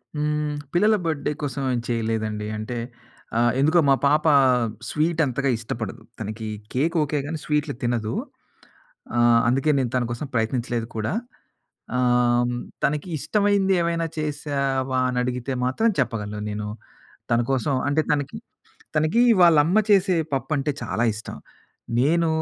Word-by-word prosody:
హ్మ్. 150 0 -1 0.2
పిల్లల 210 +5 +4
బర్త్‌డే 150 -2 -1
కోసం 140 -1 -3
ఏం 120 - 0
చేయలేదండి. 110 -2 -1
అంటే 115 +3 -5 0.6
ఆహ్, 120 0 +4
ఎందుకో 155 +5 +4
మా - - +7
పాప 150 +2 +3 0.6
స్వీట్ 160 +2 0
అంతగా 135 +1 -1
ఇష్టపడదు. 115 -2 -5 0.2
తనకి 110 +1 -5 0.3
కేక్ 160 +7 0
ఓకే. 150 0 -1
గాని 160 +2 -3
స్వీట్‌లు 150 -1 0
తినదు. 115 -2 -1 1.0
ఆహ్, 120 -1 +5
అందుకే 135 +5 +2
నేను 125 -2 -1
తన 125 - +2
కోసం 130 +5 -4
ప్రయత్నించలేదు 115 0 -1
కూడా. 110 - -1 0.8
ఆహ్, 120 -1 +3 0.3
తనకి 150 +3 -1
ఇష్టమైంది 200 +3 +2
ఏమైనా 170 -1 0
చేశావా 140 -3 -1
అని 125 - -3
అడిగితే 125 +1 -3
మాత్రం 220 - +2
చెప్పగలను 105 -4 -2
నేను. 105 0 -4 0.6
తన 115 - +4
కోసం 135 +2 0 0.2
అంటే 155 +2 +2
తనకి 145 -2 -1 0.6
తనకి 155 +10 +3 0.2
వాళ్ళ 170 -3 +7
అమ్మ 180 +7 +2
చేసే 195 -2 +4 0.2
పప్పంటే 135 +2 0
చాలా 120 - -1
ఇష్టం. 110 - -7 0.6
నేను 165 +5 +3
135 Hz, 130 wpm, -24 LUFS, 120-155 Hz, 1.0 s, మా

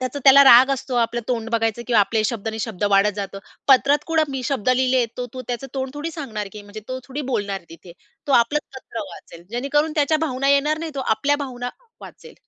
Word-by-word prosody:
त्याचा 255 +2 -3
त्याला 280 +1 +8
राग 260 +1 +8
असतो 260 -1 -4
आपलं 235 0 0
तोंड 230 -2 -2
बघायचं 225 0 0
किंवा 235 -4 +4
आपले 215 +2 +1
शब्द 225 -1 -2
आणि 220 0 -5
शब्द 205 -2 -4
वाढत 200 +1 +4
जातो. 195 -1 -5 0.3
पत्रात 280 +2 +4
कुठं 320 -3 +1
मी 265 -1 -3
शब्द 255 -3 -2
लिहिले 255 -1 +2
तो 250 0 -4
तो 255 - -6
त्याचं 245 +2 -4
तोंड 265 -1 -3
थोडी 300 +3 -4
सांगणार 225 -11 -6
की 210 -1 -9
म्हणजे 205 +1 -10
तो 255 0 -4
थोडी 290 +3 -4
बोलणार 200 -4 -2
तिथे. 170 +1 -13 0.3
तो 280 - 0
आपलंच 260 +5 +3
पत्र 235 -3 -7
वाचेल. 170 0 -13
जेणेकरून 285 +6 0
त्याच्या 300 +1 +3
भावना 270 0 -1
येणार 295 +2 +2
नाही. 325 -1 -5
तो 275 - -3
आपल्या 280 +4 +1
भावना 245 -1 -5 0.3
वाचेल. - - -13
255 Hz, 210 wpm, -21 LUFS, 225-280 Hz, 0.3 s, त्याला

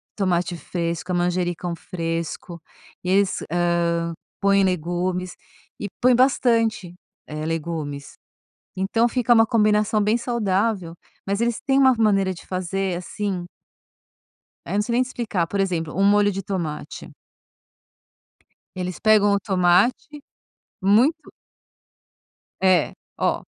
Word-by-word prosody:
Tomate 180 -3 0
fresco, 170 +1 -4
a - - 0
manjericão 175 0 -1
fresco, 165 0 -5 0.4
e 180 - -3
eles, 195 0 +2
hã, 170 -1 0 0.3
põem 200 0 +3
legumes, 180 0 -1 0.4
e 205 - -3
põem 250 0 +4
bastante, 230 -7 +2 0.3
eh, 155 0 -6
legumes. 155 -3 -4 0.6
Então 205 +5 +1
fica 240 0 +2
uma 225 -1 +5
combinação 215 -2 +2
bem 210 +3 +2
saudável, 210 -6 -1 0.3
mas 200 +3 -1
eles 235 -1 0
têm 270 0 +3
uma 265 -1 +6
maneira 195 -4 +2
de 175 - -12
fazer, 185 0 -2
assim 185 0 -4 1.2
é, - - -4
não 205 - +2
sei 235 +3 -4
nem 250 - +3
explicar, 230 -8 -2
por 200 +4 -2
exemplo, 170 -5 -1
um 195 - +2
molho 205 0 +4
de 195 +1 -4
tomate 170 -6 -5 1.6
eles 180 -1 -4
pegam 210 -2 +4
o 200 - 0
tomate 195 +10 +1 0.6
muito 245 - +2 1.3
É, 185 -4 +3 0.2
ó, - - 0
190 Hz, 120 wpm, -23 LUFS, 175-215 Hz, 1.6 s, uma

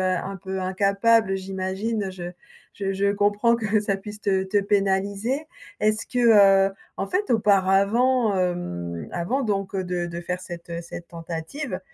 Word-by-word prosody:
un 195 +2 -4
peu 190 +1 -5
incapable, 200 +3 +2
heu, - - +1
j'imagine 190 +3 -3
je 175 -1 -6 0.4
je 195 -1 -3
je 200 +1 +1
comprends 205 +3 +2
que 215 -2 +1
ça 200 -2 0
puisse 210 +1 -9
te 190 -2 +1
te 195 +2 +1
pénaliser. 200 +8 0 0.3
Est-ce 215 0 +1
que 250 - -1 0.5
heu, - - -11 0.2
en 195 - -2
fait 390 -2 0
auparavant, 205 +3 +3
hem, 85 - -3
avant 210 +11 -1
donc, 195 -3 -2
heu, 190 - 0
de 180 -1 -2
de 170 0 -6
faire 180 +1 -4
cette, 175 -1 -9
heu, 170 0 -3
cette 170 0 -9
tentative, 170 - -5
195 Hz, 160 wpm, -24 LUFS, 185-215 Hz, 0.5 s, auparavant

